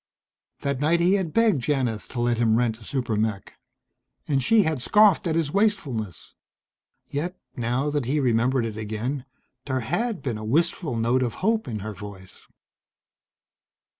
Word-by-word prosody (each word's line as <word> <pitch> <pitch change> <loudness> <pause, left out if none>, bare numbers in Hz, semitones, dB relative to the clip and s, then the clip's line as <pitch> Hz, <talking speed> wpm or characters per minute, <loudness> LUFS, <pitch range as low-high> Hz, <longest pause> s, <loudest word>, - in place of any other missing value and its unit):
That 140 -2 -1
night 160 +4 +2
he 175 +3 +4
had 190 -5 0
begged 220 - +3
Janith 125 -6 -1
to 125 - -6
let 120 -1 +1
him 115 -2 +3
rent 115 -1 +1
a - - -14
super 125 -3 -2
mech. 105 -2 -2 0.7
And 140 -3 +1
she 215 - +4
had 155 -6 -1
scoffed 200 - +4
at 160 - 0
his 160 -3 0
wastefulness. 150 - -1 0.7
Yet, 175 +6 -3 0.2
now 125 +3 -1
that 145 -4 -1
he 145 +5 +1
remembered 125 -1 +2
it 110 -2 -5
again, 110 +6 -3 0.4
there 130 -2 -1
had 220 - -2
been 120 -5 -2
a - - -7
wistful 150 - 0
note 120 +3 +2
of 120 -3 -1
hope 220 0 +2
in 110 -4 -4
her 110 +1 -5
voice. 100 -2 -11
130 Hz, 165 wpm, -25 LUFS, 115-160 Hz, 0.7 s, he